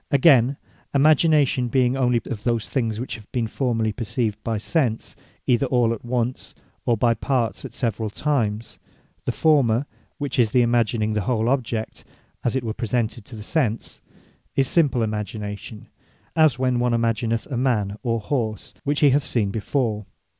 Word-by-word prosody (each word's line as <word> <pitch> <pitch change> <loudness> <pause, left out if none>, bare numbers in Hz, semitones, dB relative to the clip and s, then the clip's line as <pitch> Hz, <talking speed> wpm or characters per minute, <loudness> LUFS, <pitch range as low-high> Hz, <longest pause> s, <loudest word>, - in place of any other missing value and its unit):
Againe, 135 -2 +5 0.4
Imagination 150 -3 +4
being 125 +1 +2
only 125 -3 +2
of 105 -3 -5
those 115 -3 -1
things 115 -5 -1
which 125 - -4
have 105 - -17
been 120 -4 0
formerly 115 -2 0
perceived 110 -1 -2
by 115 -1 -1
Sense, 120 0 -1 0.3
either 125 +2 +2
all 120 -2 +2
at 115 - -8
once, 120 0 -2 0.3
or 120 -2 +3
by 115 +2 +3
parts 125 -1 -1
at 120 - -9
severall 115 -3 -1
times; 115 -4 -1 0.5
The - - +1
former, 140 -5 +3 0.3
(which 140 -3 -3
is 115 -3 +3
the 125 -1 +5
imagining 115 -2 +1
the 105 - 0
whole 110 +2 0
object, 120 -4 -2 0.4
as 120 - 0
it 130 - 0
was 110 -1 -4
presented 115 -1 -2
to 120 - -10
the 105 - -8
sense) 115 -4 -1 0.5
is 135 -1 +2
Simple 140 -8 +2
Imagination; 105 0 -5 0.5
as 155 -5 +4
when 125 -1 +1
one 120 0 +1
imagineth 115 0 0
a - - -1
man, 115 -6 0
or 115 -3 0
horse, 110 -3 -3
which 145 +1 0
he 145 -2 +6
hath 140 +2 +3
seen 105 -8 0
before. 110 -1 -1
120 Hz, 165 wpm, -23 LUFS, 110-130 Hz, 0.5 s, he